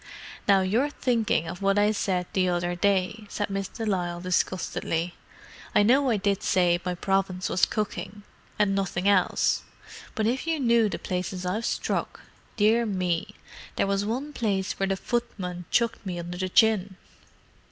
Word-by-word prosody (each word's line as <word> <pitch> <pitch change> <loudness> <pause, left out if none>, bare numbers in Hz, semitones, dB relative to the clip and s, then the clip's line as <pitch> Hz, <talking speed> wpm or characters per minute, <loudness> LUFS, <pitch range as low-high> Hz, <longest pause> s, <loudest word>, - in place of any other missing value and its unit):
"Now, 195 -2 +5
you're 225 +10 +1
thinking 230 - 0
of 180 - -6
what 195 0 +2
I 205 +1 +4
said 185 -4 -1
the 185 -1 +2
other 175 0 0
day," 200 +3 0
said 205 -1 -3
Miss 195 -1 -2
de 225 - -6
Lisle 175 -4 -1
disgustedly. 175 -1 -1 0.6
"I 205 - +6
know 260 +5 +4
I 225 - +2
did 200 -1 0
say 175 -2 +2
my 180 0 -2
province 190 0 0
was 180 - +3
cooking, 205 -1 -4 0.3
and 205 -2 +2
nothing 195 -1 -1
else. 200 -3 +3 0.5
But 220 -3 0
if 255 +7 -1
you 325 -2 0
knew 235 -4 +3
the - - -3
places 180 0 -4
I've 210 +6 -1
struck. - - -2 0.4
Dear 225 +2 +4
me, 180 -4 -1 0.4
there - - +1
was 195 0 0
one 260 +8 -3
place 195 -6 -1
where 195 - +1
the 195 0 0
footman 185 -6 -3
chucked 235 -1 +1
me 185 -3 -4
under 175 +1 -6
the 185 0 -1
chin!" 205 -2 +3
195 Hz, 165 wpm, -26 LUFS, 180-220 Hz, 0.6 s, I